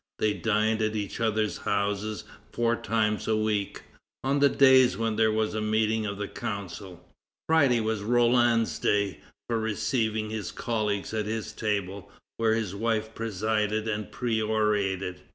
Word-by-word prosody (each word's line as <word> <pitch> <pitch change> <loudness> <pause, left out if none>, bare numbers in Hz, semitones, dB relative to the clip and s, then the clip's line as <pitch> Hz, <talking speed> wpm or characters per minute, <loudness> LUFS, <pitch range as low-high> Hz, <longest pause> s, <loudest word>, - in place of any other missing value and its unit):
They 105 -1 +1
dined 110 +1 +1
at 110 0 0
each 105 0 -4
other's 110 -2 0
houses 105 +1 -1 0.3
four 120 0 +1
times 110 -2 -1
a 110 -1 +2
week, 105 -2 -1 0.4
on 140 +2 +1
the 140 0 +5
days 130 -2 +5
when 115 -1 -1
there 110 0 +3
was 110 0 0
a 110 - -2
meeting 110 0 +1
of 100 0 -4
the 105 0 -3
Council. 95 -3 -7 0.4
Friday 140 -7 +4
was 110 -1 -1
Roland's 120 0 +3
day 100 -3 +1 0.3
for 115 -1 0
receiving 110 0 -1
his 110 -3 -4
colleagues 105 -3 -2
at 105 -1 -1
his 110 0 -3
table, 100 -3 -3 0.3
where 110 -1 +2
his 110 -5 -2
wife 110 +1 -1
presided 110 0 -1
and 105 -3 -3
perorated. 105 -5 0
110 Hz, 150 wpm, -27 LUFS, 105-115 Hz, 0.4 s, the